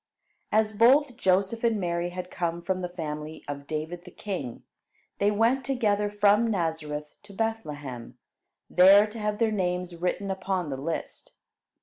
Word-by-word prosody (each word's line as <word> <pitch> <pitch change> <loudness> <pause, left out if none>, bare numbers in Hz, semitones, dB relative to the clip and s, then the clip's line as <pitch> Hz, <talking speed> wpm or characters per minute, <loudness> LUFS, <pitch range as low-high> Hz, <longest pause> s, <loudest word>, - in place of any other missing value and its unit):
As 215 0 +2
both 255 +4 +5
Joseph 195 +1 +1
and 230 -3 +2
Mary 175 -1 -1
had 180 0 -7
come 170 -1 -2
from 185 0 -1
the 180 - -3
family 155 -2 -6
of 140 0 -6
David 160 +3 -4
the 180 - -11
king, 175 - -6 0.6
they 200 - +3
went 230 +6 +2
together 215 -6 +1
from 205 +2 +3
Nazareth 160 -6 -3
to 205 0 -14
Bethlehem, 145 - -4 0.5
there 195 +3 +7
to 215 +1 -8
have 210 0 -1
their 225 -1 +2
names 180 -3 -1
written 180 +3 -2
upon 190 -4 -2
the 135 - -3
list. 155 +5 -5
185 Hz, 150 wpm, -27 LUFS, 165-210 Hz, 0.6 s, there